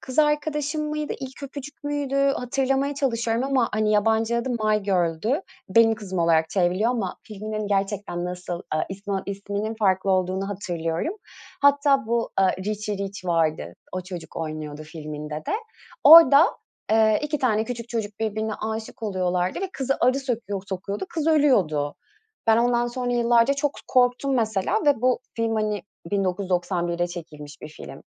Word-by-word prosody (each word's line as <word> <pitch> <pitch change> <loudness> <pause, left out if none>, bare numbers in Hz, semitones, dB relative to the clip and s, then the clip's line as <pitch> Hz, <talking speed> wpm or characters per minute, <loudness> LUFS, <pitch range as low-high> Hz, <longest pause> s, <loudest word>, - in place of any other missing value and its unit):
Kız 260 +1 -8
Arkadaşım 300 0 +1
mıydı? 300 0 -3
İlk 265 +1 -8
Öpücük 285 +1 -8
müydü? 290 -2 -2
Hatırlamaya 275 +1 +1
çalışıyorum 235 -3 0
ama, 265 -4 +2
hani, 215 0 +1
yabancı 220 +2 +2
adı 235 +2 -1
My 215 -3 +1
Girl'dü. 190 - 0 0.3
Benim 225 +3 +5
Kızım 195 -4 -6
olarak 160 -1 +3
çevriliyor 185 +4 +2
ama 220 -7 -2
filminin 215 0 -5
gerçekten 195 -3 -1
nasıl, 180 0 -5
eee, 155 - 0
ismi 195 0 -4
isminin 200 +2 -3
farklı 190 -2 +2
olduğunu 185 +1 0
hatırlıyorum. 175 - -3 0.5
Hatta 280 -2 +4
bu, 235 0 0
eee, 190 -1 +3
Richy 210 0 -3
Rich 200 -1 -5
vardı, 155 - 0 0.2
o 185 - -2
çocuk 180 -2 -9
oynuyordu 155 -2 -5
filminde 150 -1 -7
de. 155 - -4 0.5
Orada, 320 0 +10 0.4
eee, 220 -1 +4
2 300 0 -1
tane 220 -5 +1
küçük 235 -1 -6
çocuk 215 -3 -4
birbirine 220 0 -1
âşık 220 +1 -5
oluyorlardı 185 - -1
ve 385 -1 -3
kızı 270 0 -1
arı 255 +2 +3
sökuyor 220 -7 -3
sokuyordu, 200 - -4
kız 320 -3 -2
ölüyordu. 190 - +3 0.5
Ben 220 - +6
ondan 240 0 +2
sonra 245 0 -2
yıllarca 240 +2 +3
çok 285 0 -1
k - - -11
korktum 255 +2 +2
mesela 220 -6 0
ve 280 -5 +3
bu 255 0 +3 0.2
film, 225 -1 0
hani, 210 -3 -1 0.3
1991'de 180 -3 0
çekilmiş 150 -4 -9
bir - - -7
film. 155 - -11
215 Hz, 150 wpm, -24 LUFS, 185-255 Hz, 0.5 s, Orada